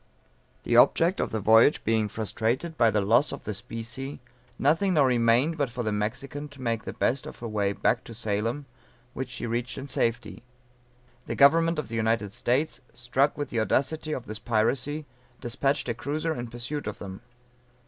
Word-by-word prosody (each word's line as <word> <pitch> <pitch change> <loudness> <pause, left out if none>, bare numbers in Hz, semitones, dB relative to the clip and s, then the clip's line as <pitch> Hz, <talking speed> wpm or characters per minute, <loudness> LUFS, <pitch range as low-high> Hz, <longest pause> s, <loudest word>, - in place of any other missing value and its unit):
_] - - -38
The - - 0
object 175 +4 +5
of - - 0
the 110 - -2
voyage 110 +7 +5
being 110 -1 +1
frustrated 115 - -2
by 115 -6 +4
the 105 -1 +1
loss 115 +8 +3
of 140 - -7
the 105 - -3
specie, 115 +7 -6 0.4
nothing 170 +6 +2
now 145 -3 +5
remained 125 +5 +3
but 140 -3 +1
for 120 0 -4
the 110 - -1
Mexican 125 +8 -3
to 145 -1 -15
make 115 -2 -1
the - - -5
best 130 +2 0
of - - -9
her 120 - -6
way 105 -2 0
back 115 +3 +1
to 115 - -9
Salem, 115 +5 -2 0.5
which 130 -1 -4
she 125 -1 -5
reached 120 +2 -3
in 135 +1 -6
safety. 115 -4 -1 0.9
The - - -3
government 165 +4 +5
of 150 - -3
the 115 - -4
United 110 -2 0
States 130 +9 0
struck 130 +4 +1
with 145 - -3
the 115 - -1
audacity 155 +7 0
of 130 -5 -3
this 110 -2 -6
piracy, 125 +7 0 0.3
despatched 135 +3 -1
a 120 - 0
cruiser 155 +6 -2
in 120 -5 -5
pursuit 120 +5 -5
of 105 - -4
them. 95 -1 -8
120 Hz, 190 wpm, -27 LUFS, 110-145 Hz, 0.9 s, object